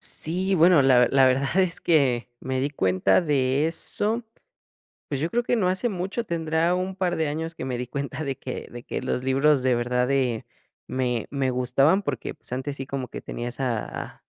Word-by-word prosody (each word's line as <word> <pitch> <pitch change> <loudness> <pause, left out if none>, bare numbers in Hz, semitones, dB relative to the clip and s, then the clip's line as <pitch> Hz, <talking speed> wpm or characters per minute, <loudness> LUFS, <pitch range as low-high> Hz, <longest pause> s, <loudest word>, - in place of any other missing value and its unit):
Sí, 185 +4 -1
bueno, 165 -3 +6
la 130 -2 +5
ver 125 - +4
la 135 -1 +6
verdad 135 +6 +1
es 180 -2 +2
que 135 -8 +2
me 130 0 -2
di 140 +2 0
cuenta 95 - +2
de 140 -3 +1
eso, 215 +7 -2 0.8
pues 140 -1 -3
yo 165 - 0
creo 240 +4 0
que 245 - +1
no 185 -5 +2
hace 190 +6 0
mucho, 195 +3 -3
tendrá 165 0 +1
un 185 +1 -2
par 180 -2 0
de 160 -2 0
años 160 +2 -4
que - - -6
me 130 -2 -2
di 125 0 -4
cuenta 140 +3 -4
de 135 -2 -2
que 130 - -6
de 120 0 -9
que - - -4
los 130 0 -2
libros 135 +2 +3
de 130 -1 +3
verdad 125 +1 +1
de, 130 -4 0 0.4
me 125 -3 -1
me 135 -2 0
gustaban 130 +9 +3
porque, 140 -8 -3
pues, - - -19
antes 130 +3 -3
sí 135 -1 -5
como 135 -1 -4
que - - -8
tenía 120 - -5
esa 120 -2 -4
140 Hz, 205 wpm, -25 LUFS, 130-170 Hz, 0.8 s, bueno